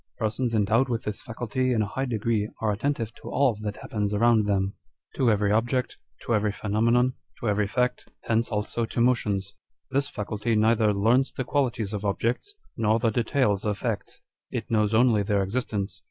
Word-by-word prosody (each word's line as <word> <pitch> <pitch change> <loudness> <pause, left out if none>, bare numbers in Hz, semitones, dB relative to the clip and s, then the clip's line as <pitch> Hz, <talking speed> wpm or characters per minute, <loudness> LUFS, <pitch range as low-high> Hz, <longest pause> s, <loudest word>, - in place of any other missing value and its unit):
Persons 115 +2 -1
endowed 110 +5 +2
with 115 -2 -1
this 105 +3 -4
faculty 125 +1 -2
in 110 -3 +2
a - - -3
high 135 +6 -2
degree 110 -3 0
are 110 -1 +1
attentive 115 +1 -2
to - - -10
all 135 -4 +2
that 105 -1 -4
happens 105 -1 -2
around 110 -1 +4
them; 100 -1 +1 0.4
to 125 - +3
every 105 -1 +2
object, 120 +4 +1 0.3
to 120 - -1
every 105 -1 +2
pheno 105 +1 -1
menon, 120 +2 +3 0.3
to 120 - -3
every 105 0 +1
fact: 125 +4 -1
hence 115 0 0
also 105 +2 -1
to 115 - -3
motions. 105 -5 +1 0.4
This 140 +1 +1
faculty 105 +2 -2
neither 110 0 +3
learns 115 +7 +2
the 130 - -3
qualities 120 -6 -1
of 105 -1 -3
objects, 115 - -1 0.2
nor 110 0 +2
the 115 -1 +1
details 115 -3 +1
of 105 -1 -1
facts: 115 -4 -4 0.3
it - - -5
knows 105 -1 +2
only 115 -2 +4
their 100 0 +1
existence. 100 -3 -3
110 Hz, 185 wpm, -26 LUFS, 105-120 Hz, 0.4 s, around